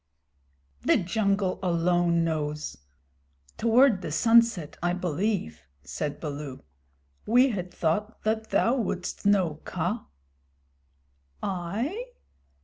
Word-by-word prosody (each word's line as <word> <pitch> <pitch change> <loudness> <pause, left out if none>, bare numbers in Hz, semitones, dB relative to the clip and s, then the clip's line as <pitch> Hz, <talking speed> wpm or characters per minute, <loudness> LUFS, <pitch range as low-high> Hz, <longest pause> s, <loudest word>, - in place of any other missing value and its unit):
"The - - +4
jungle 195 0 0
alone 175 -1 +2
knows. 150 -2 -2 0.8
Toward 235 -2 +4
the - - -5
sunset, 225 -3 +3
I 175 +1 +1
believe," 180 - -2 0.2
said 150 -1 -4
Baloo. 145 -3 -6 0.6
"We 250 +4 +5
had 180 -6 -4
thought 205 +8 -2
that 220 0 -1
thou 240 +4 +2
wouldst 200 -3 -2
know, 180 -7 +2
Kaa." - - -3 1.4
"I? 210 - -2
185 Hz, 95 wpm, -27 LUFS, 165-220 Hz, 1.4 s, We